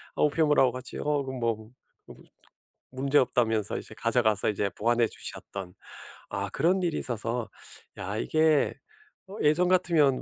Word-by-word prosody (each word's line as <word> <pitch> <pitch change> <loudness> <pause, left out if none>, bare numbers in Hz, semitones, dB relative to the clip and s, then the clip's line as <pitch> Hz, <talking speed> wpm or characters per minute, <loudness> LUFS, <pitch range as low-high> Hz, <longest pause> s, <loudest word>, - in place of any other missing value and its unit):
아. - - +1
우편물하고 150 -3 +3
같이 130 +1 -7
어 - - -4 0.2
뭐 115 -4 -3 0.4
무 - - -11 0.8
문제없다면서 125 -5 +1
이제 - - -9
가져 - - +1
가서 110 -2 +2
이제 105 -1 0
보관해 120 +3 +1
주셨던 95 -3 -5 0.6
아 100 0 -2
그런 180 - +1
일이 170 -2 0
있어서. 120 -2 -3 0.5
야. 100 +3 -3
이게 155 +1 +2 0.5
어 200 - -9
예전 160 +4 +3
같으면 170 -7 +3
130 Hz, 280 characters per minute, -28 LUFS, 110-155 Hz, 0.8 s, 우편물하고